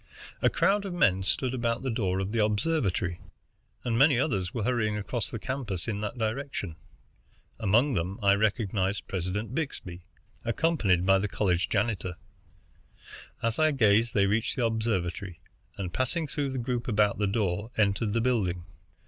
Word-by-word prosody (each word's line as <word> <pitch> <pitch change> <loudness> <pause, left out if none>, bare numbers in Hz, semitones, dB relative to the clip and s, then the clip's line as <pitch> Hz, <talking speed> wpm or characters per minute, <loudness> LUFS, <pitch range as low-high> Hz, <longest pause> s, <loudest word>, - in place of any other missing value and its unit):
A - - +5
crowd 200 +1 +2
of 190 -3 -4
men 95 - +3
stood 125 +6 -1
about 120 -1 -1
the 130 - -1
door 95 -5 0
of 95 +1 -2
the 115 -1 +2
observatory, 105 - 0 0.6
and 120 -2 0
many 140 -2 +6
others 95 - 0
were 115 - -3
hurrying 110 -3 +1
across 105 +2 -3
the - - -4
campus 115 -6 -4
in 105 -2 -2
that 105 +4 -4
direction. 110 - -3 0.8
Among 115 +6 +3
them 90 +2 -2
I 100 0 +6
recognized 100 -2 0
President 95 +5 -3
Byxbee, 110 - -4 0.4
accompanied 115 - +2
by 95 0 +5
the 105 - -1
college 95 -3 0
janitor. 95 -4 -1 1.3
As 115 +3 0
I 155 0 +5
gazed 115 -2 +3
they 100 -1 +4
reached 105 +4 0
the 125 - +1
observatory, 100 -5 -2 0.4
and, 90 -3 -4
passing 155 +6 -1
through 145 -1 -2
the 130 - -4
group 120 -1 -2
about 105 -3 +2
the 105 - +2
door, 100 0 -1
entered 105 0 +2
the 115 - +2
building. 95 -8 0
110 Hz, 160 wpm, -28 LUFS, 95-125 Hz, 1.3 s, many